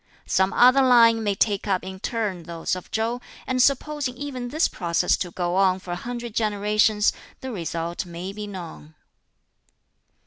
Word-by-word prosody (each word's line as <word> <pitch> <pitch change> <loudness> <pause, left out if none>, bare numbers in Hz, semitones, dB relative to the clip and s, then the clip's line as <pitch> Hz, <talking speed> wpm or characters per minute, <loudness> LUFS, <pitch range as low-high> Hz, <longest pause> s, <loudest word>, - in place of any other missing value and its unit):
Some 190 +1 +2
other 255 +2 +6
line 230 -3 +5
may 205 -2 0
take 200 0 0
up 190 -3 0
in 190 0 -7
turn 210 -5 -2
those 165 +1 -3
of 185 - -9
Chow; 230 +2 -1 0.2
and 255 -1 +1
supposing 275 -1 +1
even 260 -3 -5
this 310 +6 +1
process 170 -3 +1
to 180 - -3
go 175 0 -2
on 190 -1 +3
for 185 -1 -8
a - - -1
hundred 240 +3 -6
generations, 210 0 +2 0.3
the 260 - -5
result 170 -3 -3
may 175 +3 -6
be 210 0 -6
known." 170 -5 -9
210 Hz, 165 wpm, -24 LUFS, 185-245 Hz, 0.3 s, other